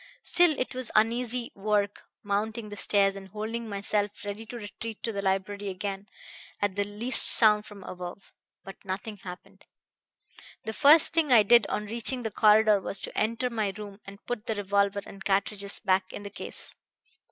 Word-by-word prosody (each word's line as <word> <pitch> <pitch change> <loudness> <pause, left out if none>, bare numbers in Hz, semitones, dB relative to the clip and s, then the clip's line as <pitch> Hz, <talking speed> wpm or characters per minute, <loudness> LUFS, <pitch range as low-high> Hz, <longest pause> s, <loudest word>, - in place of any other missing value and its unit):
Still, 345 -4 +3
it 255 - -3
was 255 -2 -3
uneasy 235 +2 +1
work 205 0 -1 0.2
mounting 210 +2 -2
the 205 - -7
stairs 200 0 +2
and 195 -1 -9
holding 220 +3 -5
myself 205 +1 -2
ready 205 +2 -6
to 240 - -7
retreat 220 0 -8
to 230 - -1
the 200 -2 -4
library 195 +1 -2
again 195 +1 -5 0.5
at 205 -2 -1
the 205 - +1
least 210 +5 +3
sound 210 -2 +5
from 200 -2 -12
above. 180 +2 -9 0.3
But 195 - -12
nothing 195 +3 -5
happened. 180 -2 -12 1.0
"The 220 - -5
first 300 +8 +6
thing 320 -4 +1
I 225 -4 +7
did 235 +1 +5
on 210 - -3
reaching 235 +4 0
the 220 - -3
corridor 215 -1 +4
was 195 - -2
to - - -7
enter 230 +3 0
my 215 -4 -1
room 205 -1 -9
and 200 +1 -13
put 245 -2 -5
the 220 - -1
revolver 200 0 0
and 195 0 -11
cartridges 200 0 0
back 190 -2 0
in 205 - -8
the 200 - -8
case. - - -4
210 Hz, 175 wpm, -27 LUFS, 200-225 Hz, 1.0 s, I